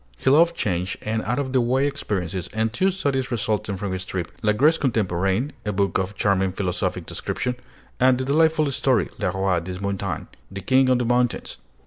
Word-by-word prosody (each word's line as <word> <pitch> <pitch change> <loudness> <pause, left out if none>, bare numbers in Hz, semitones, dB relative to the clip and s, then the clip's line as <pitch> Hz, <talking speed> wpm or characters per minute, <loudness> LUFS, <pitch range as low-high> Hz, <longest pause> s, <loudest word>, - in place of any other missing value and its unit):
He 130 - +2
loved 170 +4 +5
change 90 - -1
and 110 +1 -1
out 120 +4 -1
of 135 -2 -2
the 130 - +4
way 130 +3 +2
experiences, 95 - -3
and 110 0 0
two 190 +10 +2
studies 140 -9 -1
resulted 105 -4 -1
from 100 0 -3
this 95 0 -3
trip: 90 -3 -4
'La 105 -1 +3
Grèce 150 +9 +3
Contemporaine,' 105 0 0
a 105 - -1
book 100 0 +1
of 95 +2 -3
charming 95 -1 +1
philosophic 90 -2 -2
description; 125 0 -3 0.4
and 130 0 +5
the 130 - -2
delightful 155 +1 +3
story - - +1
'Le - - 0
Roi 95 -2 +1
des 90 +2 -6
Montagnes' 100 -2 -3 0.2
(The 95 0 -7
King 130 +2 +3
of 130 - +4
the 125 - -1
Mountains). 120 0 0
110 Hz, 190 wpm, -23 LUFS, 95-130 Hz, 0.4 s, loved